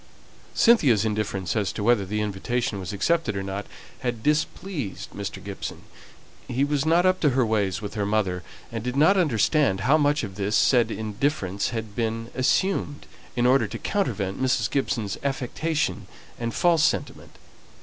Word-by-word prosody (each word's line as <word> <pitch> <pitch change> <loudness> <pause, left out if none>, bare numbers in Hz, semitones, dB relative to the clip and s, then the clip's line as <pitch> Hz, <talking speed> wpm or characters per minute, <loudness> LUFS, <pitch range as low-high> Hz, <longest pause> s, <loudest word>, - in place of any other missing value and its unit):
Cynthia's 140 - +5
indifference 105 -4 -2
as 105 -3 0
to 105 - -4
whether 110 -4 +3
the 105 +2 -1
invitation 105 +2 -2
was 90 -3 -5
accepted 165 - 0
or 95 - -2
not 100 +1 -5 0.3
had 120 -3 -3
displeased 150 - -2
Mr. - - -6
Gibson. - - -6 0.6
He 125 +3 0
was 145 +1 0
not 170 +3 +4
up 185 0 +3
to 150 - +3
her 130 -1 +2
ways 105 -3 0
with 100 - -5
her 105 -2 -2
mother, 100 -4 0 0.3
and 115 -2 -4
did 125 +1 -3
not 160 +8 +5
understand 145 - +2
how 140 +8 +4
much 145 0 +2
of 95 -3 -6
this 100 +1 0
said 120 -3 +4
indifference 105 -2 -1
had 110 -3 -5
been 115 0 -2
assumed 145 +2 0 0.3
in 120 -1 +1
order 125 -3 +4
to 115 +3 -6
countervent 110 - -2
Mrs. 125 -5 +1
Gibson's 115 -7 -1
affectation 140 +3 -2 0.3
and 115 -1 -2
false 170 +3 +3
sentiment. - - -1
115 Hz, 160 wpm, -25 LUFS, 105-145 Hz, 0.6 s, Cynthia's